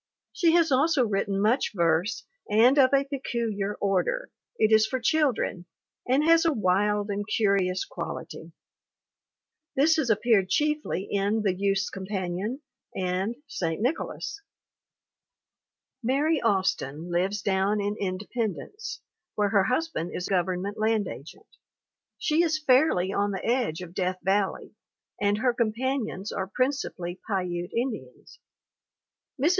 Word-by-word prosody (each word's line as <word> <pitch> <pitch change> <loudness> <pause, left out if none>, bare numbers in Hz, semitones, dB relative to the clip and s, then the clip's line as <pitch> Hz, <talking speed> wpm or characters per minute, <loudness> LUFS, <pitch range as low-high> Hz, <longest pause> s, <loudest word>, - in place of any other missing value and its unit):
She 335 -4 +3
has 335 -3 +4
also 275 0 +3
written 195 -2 -1
much 220 +6 +2
verse 170 +3 +1 0.2
and 240 +7 +5
of 260 -1 +6
a 275 0 +4
peculiar 230 -7 -3
order. 200 - -1 0.3
It 215 0 +3
is 220 0 +5
for 260 - -2
children, 250 - 0 0.4
and 270 +4 +3
has 330 +1 +5
a 330 - +3
wild 205 0 +1
and 205 +1 -2
curious 195 -4 +1
quality. - - -7 1.2
This 310 +4 +4
has 290 -6 0
appeared 215 -3 +3
chiefly 300 - 0
in 205 +2 +1
the 195 -3 +2
Youth's 195 +1 0
Companion 195 +6 -4 0.3
and 185 +4 -1
St. 165 - -3
Nicholas. 280 - -3 1.6
"Mary 285 +6 +1
Austin 180 - 0
lives 190 +4 0
down 195 +1 +1
in 205 +1 -1
Independence, 210 - -4 0.3
where 205 -1 +1
her 195 -2 +3
husband 255 - -1
is 180 - -3
Government 190 +2 -1
land 215 -2 +1
agent. 160 - -10 0.7
She 310 +1 +2
is 320 -2 +2
fairly 255 - +3
on 205 0 +1
the 195 -2 -4
edge 230 -9 0
of 175 -1 -9
Death 185 0 -1
Valley, 195 +1 0 0.5
and 205 0 +2
her 250 +2 +2
companions 235 -3 -2
are 190 -1 -3
principally 225 -9 -2
Piute 180 -3 -2
Indians.... 235 0 -5 1.0
Mrs. 290 +5 +3
210 Hz, 130 wpm, -27 LUFS, 190-260 Hz, 1.6 s, of